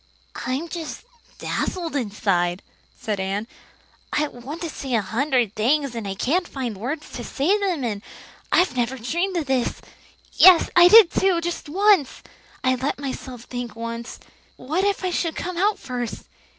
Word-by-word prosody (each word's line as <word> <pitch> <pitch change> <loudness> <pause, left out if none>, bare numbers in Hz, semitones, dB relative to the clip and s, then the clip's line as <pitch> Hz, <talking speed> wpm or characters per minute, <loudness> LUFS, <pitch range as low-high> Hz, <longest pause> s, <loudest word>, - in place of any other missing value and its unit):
"I'm 265 +6 -2
just 330 -2 -6 0.3
dazzled 340 -4 -3
inside," 195 -7 0 0.3
said 210 -3 -3
Anne. 195 +3 -2 0.7
"I 300 0 0
want 265 +7 -8
to 335 - -3
say 265 -3 -3
a 225 - +3
hundred 245 0 0
things, 275 +5 +1
and 230 -3 -5
I 195 - -3
can't 340 - 0
find 250 -5 -4
words 265 +10 -5
to 245 - -6
say 295 - +1
them 365 -8 -1
in. 210 -4 -2 0.5
I 360 - +5
never 250 +1 -1
dreamed 345 - -1
of 325 - -1
this 265 -2 0 0.5
yes, 365 -2 +7
I 350 0 +9
did 425 -2 +8
too, 380 -3 +2
just 340 -3 -4
once! 385 -4 +3 0.4
I 255 0 +3
let 260 +3 -2
myself 260 -3 -6
think 245 -3 -6
once, 230 +1 -6 0.4
'What 310 +9 -1
if 400 -1 0
I 370 - 0
should 335 -2 -1
come 360 0 -4
out 415 +3 +2
first? 245 -2 -5
270 Hz, 165 wpm, -23 LUFS, 235-340 Hz, 0.7 s, I